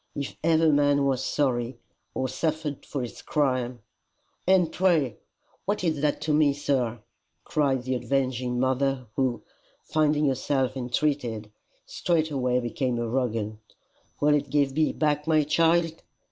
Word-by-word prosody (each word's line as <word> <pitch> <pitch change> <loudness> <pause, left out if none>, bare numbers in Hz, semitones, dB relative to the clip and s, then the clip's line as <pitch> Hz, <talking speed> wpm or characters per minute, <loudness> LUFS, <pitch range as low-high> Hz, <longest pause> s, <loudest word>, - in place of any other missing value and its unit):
If 140 -2 -4
ever 160 -1 +4
man 145 -1 +3
was 130 -1 0
sorry, 125 -4 0 0.4
or 130 - 0
suffered 150 +1 -3
for 140 -3 -3
his 120 - -8
crime, 130 -5 -1 0.3
" - - -44
"And 180 -3 +4
pray 160 - +2 0.5
what 205 -1 -1
is 160 -5 0
that 150 -1 0
to 155 - 0
me, 150 -2 +4
sir?" 125 -6 -1 0.4
cried 135 -4 0
the 130 +1 -1
avenging 125 0 -1
mother, 130 0 0
who, 130 -3 0 0.4
finding 150 -1 +2
herself 135 -1 0
entreated, 125 -4 -1 0.3
straightway 145 -7 0
became 125 0 -2
arrogant. 115 -3 -2 0.6
"Will 150 0 +4
it 145 -1 0
give 140 -2 +2
me 155 +2 +2
back 150 0 0
my 155 -1 +4
child? 165 +2 +2
140 Hz, 135 wpm, -26 LUFS, 125-150 Hz, 0.6 s, ever